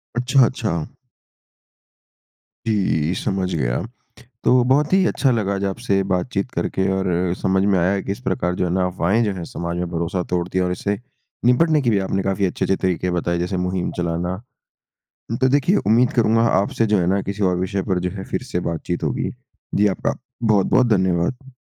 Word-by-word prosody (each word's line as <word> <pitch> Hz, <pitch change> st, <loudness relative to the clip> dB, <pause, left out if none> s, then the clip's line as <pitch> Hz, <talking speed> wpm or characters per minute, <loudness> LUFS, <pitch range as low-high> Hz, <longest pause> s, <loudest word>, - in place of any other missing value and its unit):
अच्छा, 125 Hz, +1 st, +4 dB
अच्छा। 105 Hz, -, -2 dB, 1.8 s
जी, 90 Hz, -7 st, +1 dB
समझ 95 Hz, -1 st, -2 dB
गया। -, -, 0 dB, 0.6 s
तो 125 Hz, 0 st, +4 dB
बहुत 145 Hz, +5 st, +3 dB
ही 190 Hz, -1 st, +4 dB
अच्छा 135 Hz, -3 st, +2 dB
लगा 105 Hz, -4 st, 0 dB
आज 100 Hz, -, -3 dB
आपसे 100 Hz, 0 st, 0 dB
बातचीत 95 Hz, +4 st, -1 dB
करके 95 Hz, 0 st, -1 dB
और 95 Hz, 0 st, -1 dB, 0.3 s
समझ 95 Hz, 0 st, +2 dB
में 100 Hz, -2 st, +3 dB
आया 95 Hz, +3 st, +2 dB
कि 100 Hz, -, -4 dB
इस 100 Hz, -, -4 dB
प्रकार 90 Hz, -8 st, -1 dB
जो 90 Hz, -, 0 dB
है 85 Hz, -, -1 dB
ना 95 Hz, -1 st, +1 dB
अफवाहें 95 Hz, +6 st, +1 dB
जो 105 Hz, -3 st, 0 dB
हैं 90 Hz, -, -6 dB
समाज 85 Hz, 0 st, -4 dB
में 90 Hz, 0 st, -2 dB
भरोसा 85 Hz, +2 st, -2 dB
तोड़ती 90 Hz, +1 st, -1 dB
हैं 90 Hz, -, +2 dB
और 90 Hz, -, -1 dB
इससे 100 Hz, +3 st, -2 dB, 0.5 s
निपटने 150 Hz, +5 st, +4 dB
के 120 Hz, -, +1 dB
लिए 105 Hz, -3 st, +2 dB
भी -, -, -1 dB
आपने 95 Hz, 0 st, -1 dB
काफ़ी 95 Hz, 0 st, 0 dB
अच्छे-अच्छे 95 Hz, +1 st, 0 dB
तरीके 90 Hz, -1 st, -1 dB
बताए 85 Hz, 0 st, 0 dB
जैसे 90 Hz, +2 st, -2 dB
मुहिम 90 Hz, 0 st, -1 dB
चलाना। 85 Hz, +1 st, -1 dB, 1.1 s
तो 130 Hz, -, +4 dB
देखिए 145 Hz, +8 st, +3 dB
उम्मीद 120 Hz, +3 st, +4 dB
करूँगा 115 Hz, -1 st, +3 dB, 0.2 s
आपसे 115 Hz, +3 st, 0 dB
जो 105 Hz, -1 st, +2 dB
है 85 Hz, -, 0 dB
ना 95 Hz, +2 st, +2 dB
किसी 100 Hz, +2 st, -4 dB
और 90 Hz, -, 0 dB
विषय 95 Hz, +1 st, -1 dB
पर 95 Hz, -2 st, +1 dB
जो -, -, -5 dB
है 95 Hz, 0 st, -7 dB
फ़िर -, -, -3 dB
से 90 Hz, -, 0 dB
बातचीत 85 Hz, +2 st, -4 dB
होगी। 70 Hz, -4 st, -1 dB, 0.4 s
जी 105 Hz, -, +3 dB
आपका -, -, -2 dB, 0.3 s
बहुत-बहुत 110 Hz, +3 st, +3 dB
धन्यवाद! 95 Hz, +9 st, -1 dB
95 Hz, 190 wpm, -21 LUFS, 90-115 Hz, 1.8 s, अच्छा